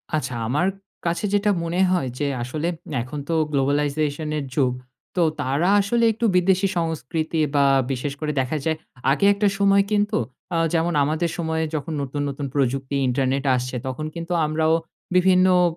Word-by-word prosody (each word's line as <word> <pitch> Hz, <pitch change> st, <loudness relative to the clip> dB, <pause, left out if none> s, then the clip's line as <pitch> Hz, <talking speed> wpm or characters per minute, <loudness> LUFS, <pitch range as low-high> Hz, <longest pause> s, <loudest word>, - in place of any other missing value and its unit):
আচ্ছা, 135 Hz, -4 st, -2 dB
আমার 150 Hz, +10 st, +1 dB, 0.4 s
কাছে 170 Hz, +4 st, 0 dB
যেটা 205 Hz, 0 st, +3 dB
মনে 170 Hz, +2 st, -2 dB
হয় 175 Hz, -8 st, +1 dB
যে 145 Hz, -, 0 dB, 0.2 s
আসলে 150 Hz, +7 st, -3 dB, 0.3 s
এখন 130 Hz, +5 st, -6 dB
তো -, -, +1 dB, 0.2 s
globalization 145 Hz, +2 st, 0 dB
এর 145 Hz, -, -3 dB
যুগ। 130 Hz, -4 st, +2 dB, 0.4 s
তো 180 Hz, -, +2 dB, 0.2 s
তারা 140 Hz, +8 st, +1 dB
আসলে 235 Hz, +4 st, +1 dB
একটু 225 Hz, +2 st, -2 dB
বিদেশি 190 Hz, +2 st, +3 dB
সংস্কৃতি 160 Hz, 0 st, -2 dB, 0.2 s
বা 140 Hz, -1 st, +4 dB, 0.3 s
বিশেষ 135 Hz, +2 st, -2 dB
করে 155 Hz, -1 st, -1 dB
দেখা 130 Hz, +4 st, -2 dB
যায় 160 Hz, -1 st, +1 dB, 0.3 s
আগে 150 Hz, +8 st, +2 dB
একটা 205 Hz, +1 st, +1 dB
সময় 200 Hz, 0 st, +4 dB
কিন্তু 210 Hz, +1 st, +2 dB, 0.4 s
আ -, -, +2 dB, 0.2 s
যেমন 170 Hz, +1 st, +1 dB
আমাদের 155 Hz, +4 st, 0 dB
সময়ে 160 Hz, -1 st, -1 dB
যখন 155 Hz, +2 st, -3 dB
নতুন, 140 Hz, +1 st, -3 dB
নতুন 140 Hz, +1 st, -4 dB
প্রযুক্তি 135 Hz, 0 st, 0 dB
ইন্টারনেট 135 Hz, +1 st, 0 dB
আসছে 125 Hz, +1 st, -3 dB
তখন 130 Hz, +4 st, -4 dB
কিন্তু 170 Hz, +1 st, -4 dB
আমরাও 155 Hz, +1 st, +1 dB, 0.4 s
বিভিন্ন 185 Hz, 0 st, +5 dB, 0.2 s
অ -, -, +4 dB
155 Hz, 165 wpm, -23 LUFS, 140-175 Hz, 0.4 s, বিভিন্ন